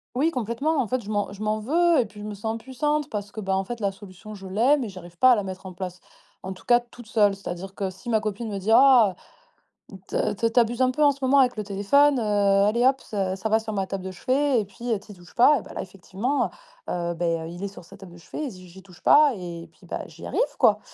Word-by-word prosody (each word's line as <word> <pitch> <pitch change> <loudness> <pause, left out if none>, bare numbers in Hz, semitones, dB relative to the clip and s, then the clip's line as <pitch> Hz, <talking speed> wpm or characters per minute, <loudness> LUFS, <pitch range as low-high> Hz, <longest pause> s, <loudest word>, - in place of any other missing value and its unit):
Oui, 310 +6 +2
complètement. 265 +5 -1
En 230 - -2
fait, 255 +2 -1
je 205 - -10
m'en 205 -1 -1
je 205 +2 -7
m'en 215 0 0
veux 330 +6 +3
et 235 - +2
puis 205 0 -12
je - - -7
me 210 - -5
sens 220 +2 -3
impuissante 295 +5 -2
parce 205 -1 -5
que, 215 - -5
ben, 190 -1 -1
en 190 0 -1
fait, 240 0 -6
la 200 -1 +1
solution, 200 +2 -12
je 195 -2 -9
l'ai 240 +10 +3
mais 250 -5 -3
j'arrive 175 -3 -11
pas 255 0 +6
à - - +6
la 205 - -1
mettre 190 0 -7
en 185 - -7
place, 180 0 -6 0.4
en 190 0 -5
tout 185 - -16
cas, 240 0 +5
toute 240 -1 -15
seule. 205 -3 +3
C'est-à-dire 190 0 -7
que 195 -2 -2
si 190 +5 -10
ma 220 -2 +2
copine 215 +1 -4
me 200 - -4
dit: 200 +4 -2
«Ah! 245 -7 +6 1.0
Tu - - -1 0.2
tu 230 0 +1
tu 245 - +4
abuses 235 +2 +1
un 255 - +4
peu 300 +4 0
en 285 - +6
ce 280 - -10
moment 270 +2 +4
avec 250 -2 +3
le 210 - -2
téléphone, 250 +9 +3
heu, - - -1
allez, 205 +3 +3
hop, 270 0 +2
ça, 190 -3 -2
ça 220 +3 -3
va 220 +1 +4
sur 220 0 -6
ma 195 -1 -1
table 195 -1 -5
de 190 - -5
chevet 260 +6 +1
et 210 - -2
puis 235 +5 -6
heu, 220 - +2
tu 205 - -15
y - - -11
touches 175 0 -18
pas» 275 +3 +6
et - - -9
bah, - - -12
là, - - -3
effectivement, 195 +8 -2 0.4
heu, 170 -1 -2
beh, 165 -1 -1
il 175 +2 -9
est - - -1
sur 195 -2 -12
sa 195 - -14
table 190 -3 -13
de - - -13
chevet 295 - -6
et - - -3
j'y 185 -3 -12
j'y 190 +2 -14
touche 185 -2 -18
pas 295 -3 +6
et 170 -2 -8
puis - - -20
bah, - - -4
j'y - - -12
arrive, - - -2 0.2
quoi! - - +4
210 Hz, 285 wpm, -25 LUFS, 190-245 Hz, 1.0 s, pas